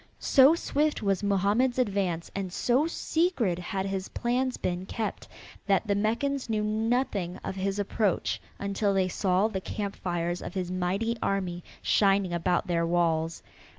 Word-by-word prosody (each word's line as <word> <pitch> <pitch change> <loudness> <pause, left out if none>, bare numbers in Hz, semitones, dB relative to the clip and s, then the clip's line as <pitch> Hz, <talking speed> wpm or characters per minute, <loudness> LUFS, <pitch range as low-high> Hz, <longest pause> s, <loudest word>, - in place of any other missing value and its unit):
So 275 +3 +6
swift 300 -5 0
was 195 -1 +1
Mohammed's 205 +6 +2
advance 195 -8 0
and 195 -2 -3
so 250 - +2
secret 320 - 0
had 190 +2 -3
his 195 -1 -3
plans 250 +1 -1
been 180 +1 -3
kept 220 -3 -4 0.4
that 195 +1 +3
the 205 - +1
Meccans 235 +6 0
knew 215 -1 0
nothing 215 -4 0
of - - -3
his 195 +1 -1
approach 205 -1 0 0.2
until 200 0 0
they 190 -1 +2
saw 185 +2 +2
the 195 -4 -4
camp 200 0 -4
fires 175 -1 -2
of 175 - -7
his 180 -1 -2
mighty 190 +6 -1
army 180 -3 -1 0.2
shining 195 -3 +3
about 175 +1 +1
their 170 -1 0
walls. 165 -1 0
195 Hz, 150 wpm, -28 LUFS, 180-225 Hz, 0.4 s, So